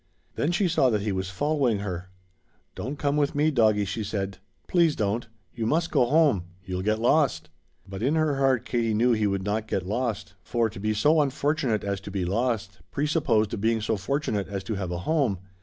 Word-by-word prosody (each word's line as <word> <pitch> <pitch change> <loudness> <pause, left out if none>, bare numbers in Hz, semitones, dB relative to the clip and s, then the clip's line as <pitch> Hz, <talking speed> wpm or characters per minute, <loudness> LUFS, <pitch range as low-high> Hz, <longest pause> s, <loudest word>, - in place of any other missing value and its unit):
Then 150 - 0
she 180 +2 +2
saw 150 -6 +3
that 105 -3 0
he 105 - -1
was 95 -1 -2
following 135 +2 +1
her. 95 -2 -5 0.6
"Don't 135 +6 -5
come 145 +1 0
with 145 -1 +1
me, 150 +2 +3
doggie," 110 -6 +3
she 110 +3 -3
said; 100 -2 -3 0.3
"please 170 -4 +3
don't. 105 +3 -1 0.3
You 115 -1 -2
must 165 +5 +1
go 125 - +4
home. 145 - +3 0.2
You'll 90 -1 -3
get 110 +3 +1
lost." 115 - +2 0.4
But 95 +1 -7
in 135 +6 +2
her 155 -3 +1
heart 135 -3 +2
Katie 115 -3 0
knew 120 +3 +3
he 110 -2 +2
would 100 -1 -1
not 105 +2 -1
get 95 -4 -2
lost, 105 -2 -2
for 115 0 0
to 100 - -9
be 110 +1 -1
so 150 +9 +4
unfortunate 140 -4 0
as 100 -1 -2
to 100 - -8
be 95 -2 -2
lost 105 -1 -1
presupposed 125 -9 +1
being 115 +1 +2
so 110 +1 0
fortunate 105 -1 -2
as 100 -1 -4
to 110 - -3
have 95 -3 -3
a 90 - -3
home. 140 -11 +1
110 Hz, 205 wpm, -26 LUFS, 100-140 Hz, 0.6 s, go